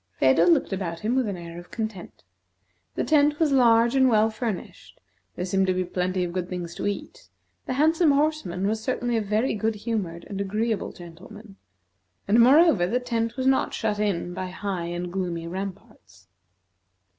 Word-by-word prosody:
Phedo 135 +6 +4
looked 175 - +3
about 170 -3 -4
him 220 +3 0
with 260 -3 +1
an 200 -3 -3
air 170 0 -8
of 175 - -13
content. 220 -5 -6 0.7
The - - -1
tent 295 -1 +3
was 315 -3 +2
large 235 -2 +4
and 260 -1 +5
well 220 -1 +3
furnished; 220 -3 -6 0.4
there 180 - -3
seemed 190 +1 +1
to 185 - +1
be 185 - 0
plenty 180 +1 -1
of 175 -1 -4
good 180 -1 -3
things 175 -2 -5
to - - -3
eat; 205 - -6 0.4
the - - -1
handsome 315 +4 +3
horseman 280 - 0
was 220 +2 -1
certainly 245 -1 -1
a 225 - +1
very 215 +5 0
good 220 +1 -1
humored 205 -6 -4
and 200 -1 -4
agreeable 215 +2 -2
gentleman; 195 +5 -13 0.7
and, 215 +4 +4
moreover, 255 - +6
the 240 +6 0
tent 230 -1 -2
was 260 - -2
not 265 0 +2
shut 210 -2 -1
in 185 -4 -1
by 185 0 -4
high 185 -1 -4
and 175 +1 -5
gloomy 175 -3 -3
ramparts. 170 - -8
205 Hz, 180 wpm, -25 LUFS, 180-235 Hz, 0.7 s, moreover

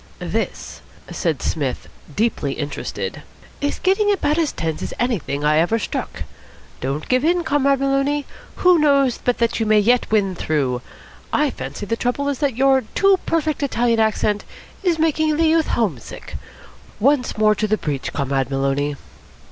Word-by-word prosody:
"This," - - -4 0.3
said 160 -6 -1
Psmith, 140 -6 -2 0.3
deeply 215 -11 0
interested, 145 -1 -5 0.4
"is 285 0 -1
getting 400 +2 +2
about 335 -5 +1
as 320 -3 +1
tense 160 -1 -3
as - - -5
anything 190 - -1
I 155 +1 +4
ever 175 +8 +2
struck. 225 - -4 0.6
Don't 140 +4 -3
give 255 +1 +2
in, 345 +2 +2
Comrade 280 -2 +2
Maloney. 275 +1 +1 0.3
Who 360 -2 +4
knows 280 -4 +3
but 245 - +1
that 235 0 0
you 225 - 0
may 215 0 +5
yet 235 +4 +3
win 200 -3 +2
through? 140 -7 -1 0.5
I 295 -2 +2
fancy 205 - -6
the 230 - -1
trouble 250 +4 -1
is 280 - -2
that 275 -6 0
your 265 0 +4
too 390 -1 +4
perfect 315 -2 0
Italian 240 -4 +1
accent 215 -1 +1 0.4
is 355 -4 +1
making 315 -1 +1
the 330 - +3
youth 320 0 +3
home 200 - 0
sick. - - -10 0.6
Once 260 0 +2
more 215 0 +4
to 215 +1 -1
the 215 +1 +1
breach, 145 -7 -3
Comrade 135 -2 -1
Maloney." 140 +1 0
240 Hz, 165 wpm, -21 LUFS, -, 0.6 s, may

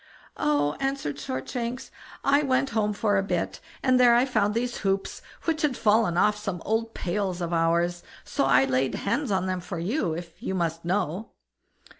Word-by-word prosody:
"Oh!" 145 0 +1
answered 270 - -2
Shortshanks, 235 - -4 0.3
"I 285 +1 +4
went 270 -1 +1
home 210 -2 +1
for 205 -1 +1
a - - 0
bit, 195 - -2 0.2
and 255 -1 +4
there 240 -1 +7
I 245 +2 +4
found 215 -5 +1
these 245 +1 -1
hoops, 195 -1 -1 0.2
which 320 -2 0
had 285 -5 +1
fallen 215 -5 +3
off 210 +3 +4
some 200 -4 -4
old 225 +1 -1
pails 185 0 -2
of 170 -1 -3
ours, 170 +1 +1 0.2
so - - 0
I 135 0 +5
laid 130 0 0
hands 275 +7 -1
on 190 -2 +1
them 185 -1 -1
for 175 0 -6
you, 180 - -1
if 170 0 -7
you 190 -6 -2
must 165 -2 -1
know." 185 +2 -2
200 Hz, 180 wpm, -26 LUFS, 170-235 Hz, 0.3 s, there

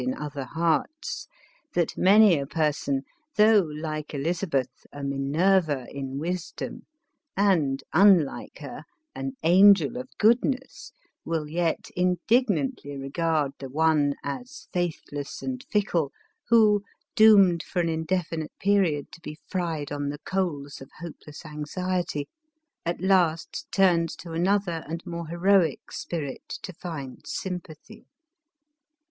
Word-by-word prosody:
in 130 +1 -1
other 145 -2 -5
hearts, 165 - -1 0.5
that 170 -2 +1
many 205 0 +6
a 140 - -4
person, 145 -3 0 0.3
though, 215 0 +6
like 155 -3 -4
Eliz 165 +5 -1
abeth, 135 -8 -2
a 145 - -8
Minerva 145 +1 +1
in 135 -1 -5
wisdom 175 +3 -5 0.5
and, 155 -10 +2
unlike 180 -5 +4
her, - - -8 0.3
an 135 0 -4
angel 195 +4 +6
of 255 0 -6
goodness, 250 +4 +1 0.3
will 160 -2 -2
yet 165 +1 -1
indignantly 180 - +1
regard 150 +1 0
the 135 - -7
one 150 -1 +2
as 250 - -6
faithless 155 -5 -3
and 260 0 -4
fickle 175 -9 +1 0.4
who, 215 -3 +5 0.3
doomed 200 -6 +7
for 180 - -4
an 170 - +2
indefinite 160 -1 -2
period 190 -8 +1
to 170 - -13
be 150 -2 -8
fried 165 -6 -2
on 145 -1 -2
the 145 - -4
coals 155 -9 -2
of 135 - -11
hopeless 160 -2 -10
anxiety, 155 +1 -3 0.6
at 170 - -1
last 180 -4 +1
turns 175 -4 +3
to 170 - -10
another 175 0 0
and 165 +2 -5
more 170 -1 -5
heroic 175 +1 +2
spirit 150 -6 -5
to 185 - -6
find 155 -7 -7
sympathy. 180 +3 -7
165 Hz, 120 wpm, -26 LUFS, 145-190 Hz, 0.6 s, doomed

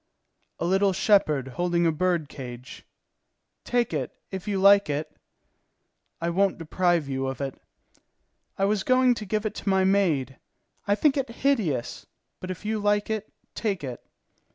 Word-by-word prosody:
"A - - -2
little 195 +2 +3
shepherd 155 - +2
holding 175 +5 0
a 165 - +4
bird 170 -1 0
cage." 125 -2 -9 0.8
"Take 240 -6 0
it, 135 -5 -2 0.2
if 190 +1 -6
you 200 -2 0
like 200 -1 +6
it." 150 +2 -3 1.0
"I 170 +1 -1
won't 195 +2 +2
deprive 170 -1 +1
you 135 -1 -2
of 135 - -4
it." 135 -2 -5 1.0
"I 195 - +2
was 205 0 +1
going 255 +2 +4
to 215 -3 -6
give 215 +2 -1
it 215 - -1
to - - -4
my 190 -1 +3
maid. 170 -10 +1 0.5
I 200 - +3
think 290 +5 +2
it 270 -2 -1
hideous; 220 - -1 0.3
but 185 - -7
if 185 +2 -6
you 215 0 -1
like 205 +1 +1
it, 215 -1 -3 0.2
take 200 -8 -2
it." 125 -3 -6
190 Hz, 160 wpm, -26 LUFS, 150-210 Hz, 1.0 s, like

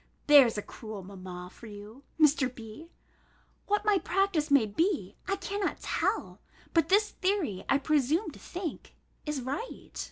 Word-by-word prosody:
There's 275 -7 +7
a 210 - -2
cruel 215 -4 -8
mamma 185 -2 -9
for 235 - -13
you, 210 +4 -11 0.2
Mr. 290 -4 +4
B.! 230 +9 -10 0.8
What 415 +1 +1
my 415 -2 +4
practice 360 -6 +1
may 280 -5 +5
be, 215 - 0
I 390 - +1
cannot 395 +1 -3
tell; - - -1 0.3
but 330 -2 +3
this 420 +2 +4
theory, 370 - -1
I 275 - +5
presume 300 - +1
to - - -14
think, 350 -3 -6 0.3
is 295 -4 -2
right. 280 - -5
295 Hz, 150 wpm, -29 LUFS, -, 0.8 s, There's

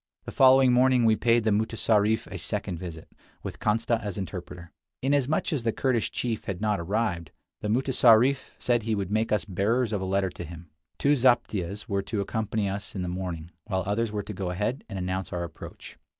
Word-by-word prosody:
The - - -6
following 130 -1 +6
morning 125 -1 +4
we 110 -1 +5
paid 115 +2 +3
the 110 - +2
mutessarif 110 0 +2
a - - -7
second 85 - -3
visit, 80 -3 -8 0.4
with - - -6
Kantsa 115 +2 +1
as 105 -4 -5
interpreter. 90 -2 -7 0.3
Inasmuch 140 +3 +1
as 145 - 0
the 115 0 0
Kurdish 125 -1 0
chief 115 -3 -3
had 95 -3 -4
not 105 -1 0
arrived, 90 -3 -1 0.3
the - - -4
mutessarif 125 +2 +4
said 120 -1 +1
he 110 0 -1
would 100 -2 -3
make 110 +1 0
us 105 - +1
bearers 110 +4 0
of 100 - -1
a - - -2
letter 95 0 0
to 85 - -7
him. 85 -1 -10 0.3
Two 140 - +2
zaptiehs 115 -7 +1
were 100 -2 0
to 105 +2 -3
accompany 110 0 -1
us 100 +2 -5
in 95 - -2
the - - -3
morning, 90 -2 -5 0.2
while 95 -3 -1
others 105 +3 0
were 105 -1 -3
to 105 - -7
go 95 -1 -3
ahead 105 +9 -2
and 100 - -5
announce 95 +1 -3
our 90 -1 -2
approach. 85 -1 -10
105 Hz, 200 wpm, -27 LUFS, 95-115 Hz, 0.4 s, following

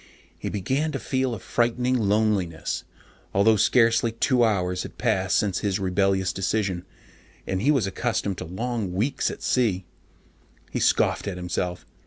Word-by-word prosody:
He - - -3
began 135 +10 -1
to 135 - -2
feel 130 -2 -1
a - - -8
frightening 120 +5 0
loneliness, 105 - 0 0.5
although 105 +3 +5
scarcely 115 +1 +3
two 125 +2 +2
hours 90 -5 +1
had - - -8
passed 95 -6 +1
since 100 -3 +1
his 100 -3 0
rebellious 95 0 +1
decision, 95 -2 -1 0.6
and 95 0 -2
he 135 - +2
was 135 -9 +3
accustomed 100 -1 -2
to 90 - -5
long 110 +1 -3
weeks 115 +10 0
alone - - -5
at - - -15
sea. 105 -8 +1 0.9
He - - -2
scoffed - - +2
at 95 -3 -3
himself. 90 -1 -3
100 Hz, 155 wpm, -25 LUFS, 95-120 Hz, 0.9 s, although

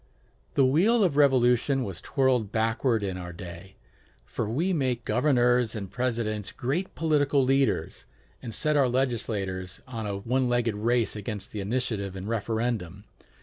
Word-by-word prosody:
The 135 - +5
wheel 200 - +4
of 170 -7 +1
revolution 130 -1 +3
has 95 -3 -6
twirled 125 -6 +1
backward 115 +1 +1
in 95 -2 -3
our 90 -1 -6
day; 85 +2 -10 0.5
for 110 - -3
we 165 +11 0
make 130 -6 -1
governors 125 -1 +2
and 100 -4 -5
presidents 115 -5 -2
great 155 +10 -3
political 145 -3 +2
leaders, 135 +1 0 0.3
and 120 - -6
set 150 +6 +1
our 135 -3 +4
legislators 105 -8 -2
on 115 -4 -5
a 100 -1 -3
one 125 +5 0
legged 120 -2 +1
race 115 +2 +1
against 105 -1 -5
the 105 - -5
initiative 100 -2 -2
and 95 +1 -6
referendum. 110 -4 -2
120 Hz, 150 wpm, -27 LUFS, 105-130 Hz, 0.5 s, The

